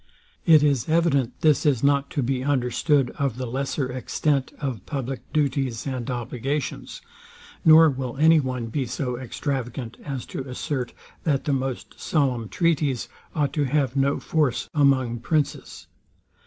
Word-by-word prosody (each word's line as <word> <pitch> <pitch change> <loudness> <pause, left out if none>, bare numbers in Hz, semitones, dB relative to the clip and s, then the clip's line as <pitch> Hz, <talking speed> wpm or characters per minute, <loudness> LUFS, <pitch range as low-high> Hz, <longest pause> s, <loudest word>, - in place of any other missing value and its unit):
It 155 -3 +7
is 140 -3 +1
evident 155 -7 +2
this 155 -2 +4
is 140 -6 +2
not 140 0 +3
to 140 - -1
be 130 +1 -1
understood 135 0 +1
of 135 -4 0
the 130 - -3
lesser 130 +1 -2
extent 135 +2 -1
of 130 -9 -4
public 135 -2 -5
duties 135 -5 0
and 130 -3 -3
obligations; 125 +3 -4 0.6
nor 160 0 +8
will 130 -3 -3
any 160 +2 +6
one 130 -4 -2
be 130 +3 -2
so 125 +1 -3
extravagant 125 -2 -4
as 135 -4 -5
to 135 0 -5
assert, 125 0 -3 0.3
that 145 -4 +1
the 145 - 0
most 130 -1 -3
solemn 130 -8 0
treaties 150 -7 0 0.3
ought 145 -3 0
to 145 -2 +1
have 135 -1 0
no 140 +1 +2
force 150 -6 0
among 130 -5 +2
princes. 150 +1 -2
135 Hz, 145 wpm, -24 LUFS, 125-145 Hz, 0.6 s, nor